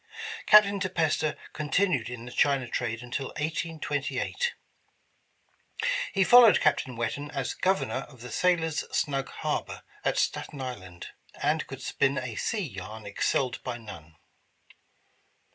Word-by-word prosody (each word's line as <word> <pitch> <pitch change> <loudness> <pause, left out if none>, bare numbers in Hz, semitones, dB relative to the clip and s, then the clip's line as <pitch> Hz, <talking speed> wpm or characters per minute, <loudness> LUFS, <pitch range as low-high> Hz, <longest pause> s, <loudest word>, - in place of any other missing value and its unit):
Captain 205 -1 +7
De 190 0 -1
Peyster 160 -3 0 0.2
continued 150 - +1
in 120 -1 -7
the 125 - -8
China 135 -1 +2
trade 115 -1 -2
until 130 +2 -3
1828. 160 - -2 1.6
He 195 - +3
fol 245 +6 +9
lowed 225 -4 +7
Captain 130 -2 +1
Whetten 120 +6 -3
as 135 -3 -3
Governor 185 -8 0
of 130 -5 -16
the 125 0 -8
Sailors' 165 +2 +1
Snug 135 -2 0
Harbor - - -3 0.2
at - - +1
Staten 145 - -1
Island, 95 -9 -7 0.3
and 150 +2 +1
could 135 -1 -8
spin 140 0 +1
a 125 -2 -3
sea 205 - -1
yarn 105 0 -8
excelled 120 +5 0
by 125 -2 -4
none. 85 -9 -11
135 Hz, 130 wpm, -28 LUFS, 120-160 Hz, 1.6 s, fol